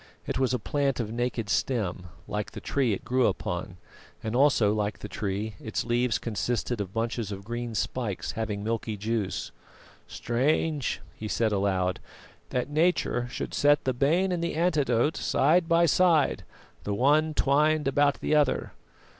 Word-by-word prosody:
It -, -, -2 dB
was 130 Hz, -2 st, +2 dB
a 125 Hz, -, +1 dB
plant 135 Hz, +3 st, -1 dB
of 110 Hz, -3 st, -2 dB
naked 120 Hz, -1 st, -2 dB
stem, 100 Hz, -6 st, -1 dB, 0.2 s
like -, -, -4 dB
the -, -, -6 dB
tree 135 Hz, -5 st, 0 dB
it 100 Hz, -, -3 dB
grew 130 Hz, 0 st, +3 dB
upon; -, -, -3 dB, 0.5 s
and, 110 Hz, +1 st, -2 dB
also 125 Hz, -6 st, +4 dB
like 105 Hz, -3 st, -1 dB
the -, -, -7 dB
tree, 105 Hz, +1 st, -3 dB
its 110 Hz, -, -3 dB
leaves 120 Hz, -1 st, +1 dB
consisted 115 Hz, +1 st, -2 dB
of 95 Hz, -2 st, -5 dB
bunches 115 Hz, -1 st, -2 dB
of 100 Hz, 0 st, -6 dB
green 120 Hz, +1 st, -4 dB
spikes 110 Hz, -2 st, -2 dB
having 110 Hz, -3 st, -3 dB
a -, -, -6 dB
milky 110 Hz, -1 st, -2 dB
juice. 105 Hz, -1 st, -2 dB, 0.6 s
"Strange," 140 Hz, +3 st, 0 dB
he 110 Hz, -, -6 dB
said 110 Hz, +1 st, +1 dB
aloud, 95 Hz, -2 st, 0 dB, 0.5 s
"that 125 Hz, -1 st, -1 dB
Nature 150 Hz, -5 st, +1 dB
should -, -, -5 dB
set 145 Hz, 0 st, +3 dB
the 130 Hz, -, 0 dB
bane 165 Hz, +9 st, +2 dB
and 175 Hz, -2 st, -1 dB
the 170 Hz, -, -2 dB
antidote 150 Hz, -5 st, +2 dB
side 165 Hz, +4 st, +2 dB
by 170 Hz, +1 st, +5 dB
side, 165 Hz, -3 st, +3 dB, 0.4 s
the 100 Hz, -, -2 dB
one 150 Hz, +6 st, +3 dB
twined 150 Hz, +2 st, +2 dB
about 145 Hz, +1 st, +2 dB
the -, -, 0 dB
other. 150 Hz, -3 st, +2 dB
120 Hz, 165 wpm, -27 LUFS, 110-145 Hz, 0.6 s, by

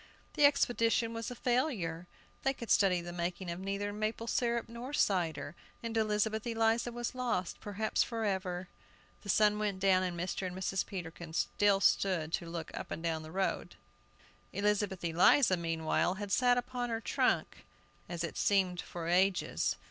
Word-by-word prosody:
The 295 Hz, -, +5 dB
expedition 230 Hz, -4 st, +2 dB
was 230 Hz, 0 st, -4 dB
a 245 Hz, -, -6 dB
failure! 230 Hz, -, -1 dB, 0.3 s
They 270 Hz, 0 st, +1 dB
could 235 Hz, -, -5 dB
study 185 Hz, -3 st, +4 dB
the 175 Hz, 0 st, -7 dB
making 175 Hz, +1 st, -3 dB
of 170 Hz, -, -5 dB
neither 200 Hz, +1 st, -3 dB
maple 215 Hz, +2 st, -2 dB
syrup 235 Hz, 0 st, 0 dB
nor 235 Hz, +4 st, -7 dB
cider, 170 Hz, -, 0 dB, 0.3 s
and 230 Hz, 0 st, -4 dB
Elizabeth 220 Hz, 0 st, +1 dB
Eliza 225 Hz, +1 st, +1 dB
was 240 Hz, +1 st, -4 dB
lost, 240 Hz, -8 st, -2 dB
perhaps 210 Hz, +1 st, -1 dB
forever! 190 Hz, -5 st, -2 dB, 0.5 s
The 200 Hz, -, -10 dB
sun 210 Hz, +1 st, +4 dB
went 205 Hz, -3 st, -1 dB
down, 190 Hz, -1 st, +4 dB
and 180 Hz, -2 st, -2 dB
Mr. 185 Hz, +1 st, -2 dB
and 180 Hz, -, -6 dB
Mrs. 190 Hz, +1 st, -1 dB
Peterkin 170 Hz, -3 st, -7 dB
still 200 Hz, +3 st, +2 dB
stood 175 Hz, -5 st, +2 dB
to 170 Hz, -, -2 dB
look 165 Hz, -1 st, -5 dB
up -, -, -6 dB
and 165 Hz, -, -5 dB
down 165 Hz, -1 st, -1 dB
the 155 Hz, -, -9 dB
road.... 190 Hz, +2 st, -2 dB, 0.8 s
Elizabeth 200 Hz, -3 st, 0 dB
Eliza 185 Hz, -, +5 dB
meanwhile, 165 Hz, +1 st, 0 dB
had 205 Hz, 0 st, -6 dB
sat 245 Hz, +2 st, +4 dB
upon 245 Hz, 0 st, -2 dB
her 225 Hz, -1 st, -1 dB
trunk, -, -, 0 dB, 0.5 s
as 170 Hz, -1 st, -3 dB
it 170 Hz, -, -4 dB
seemed 185 Hz, -3 st, +2 dB
for 170 Hz, -1 st, -6 dB
ages. 185 Hz, +2 st, +2 dB
195 Hz, 165 wpm, -32 LUFS, 175-230 Hz, 0.8 s, The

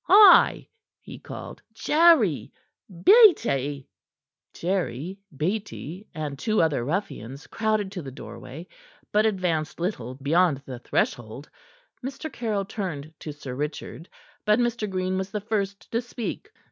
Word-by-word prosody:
"Hi!" 410 Hz, +3 st, +7 dB, 0.3 s
he -, -, -11 dB
called. -, -, -9 dB
"Jerry! 300 Hz, -, +4 dB, 0.4 s
Beattie!" 170 Hz, -, +5 dB, 0.6 s
Jerry, 180 Hz, -1 st, -2 dB, 0.2 s
Beattie, 190 Hz, +1 st, -3 dB
and 150 Hz, -3 st, -4 dB
two 215 Hz, -1 st, +1 dB
other 155 Hz, -7 st, +2 dB
ruffians 140 Hz, -, -4 dB
crowded 215 Hz, -3 st, -1 dB
to 190 Hz, -3 st, -5 dB
the 140 Hz, -, -7 dB
doorway, 135 Hz, +4 st, -9 dB, 0.5 s
but 215 Hz, +1 st, +4 dB
advanced 175 Hz, -7 st, -1 dB
little 130 Hz, -, -3 dB
beyond 145 Hz, +1 st, +2 dB
the 125 Hz, -2 st, -7 dB
threshold. 120 Hz, +2 st, -2 dB, 0.5 s
Mr. 275 Hz, +4 st, -6 dB
Caryll 215 Hz, -4 st, -1 dB
turned 160 Hz, -8 st, -5 dB
to 155 Hz, -, -6 dB
Sir 145 Hz, -3 st, -8 dB
Richard. 150 Hz, +4 st, -5 dB, 0.3 s
But 210 Hz, 0 st, +4 dB
Mr. 235 Hz, -3 st, 0 dB
Green 185 Hz, 0 st, -1 dB
was 190 Hz, 0 st, -3 dB
the 210 Hz, -, -3 dB
first 200 Hz, -2 st, -3 dB
to 230 Hz, -, +1 dB
speak. 245 Hz, -, -6 dB
185 Hz, 125 wpm, -25 LUFS, 145-215 Hz, 0.6 s, Hi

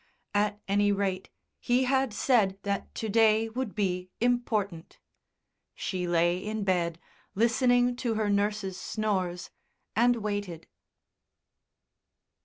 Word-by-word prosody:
At 205 Hz, 0 st, +1 dB
any 205 Hz, +1 st, +3 dB
rate, 195 Hz, -2 st, -1 dB, 0.3 s
he 245 Hz, +2 st, +2 dB
had 265 Hz, -1 st, +1 dB
said 210 Hz, -3 st, +2 dB
that 200 Hz, -1 st, -3 dB
to 220 Hz, -, -3 dB
day 220 Hz, +1 st, +3 dB
would 240 Hz, -1 st, -4 dB
be 185 Hz, -3 st, -1 dB
important.... 220 Hz, -8 st, -1 dB, 0.8 s
She 180 Hz, -2 st, -3 dB
lay 175 Hz, +1 st, +2 dB
in 215 Hz, +2 st, -3 dB
bed, 175 Hz, -4 st, 0 dB, 0.4 s
listening 245 Hz, +3 st, +3 dB
to 235 Hz, -3 st, -1 dB
her 215 Hz, -1 st, 0 dB
nurse's 205 Hz, -1 st, 0 dB
snores, 190 Hz, -5 st, -2 dB, 0.4 s
and 240 Hz, +3 st, +4 dB
waited. 205 Hz, -7 st, -4 dB
205 Hz, 110 wpm, -28 LUFS, 190-230 Hz, 0.8 s, and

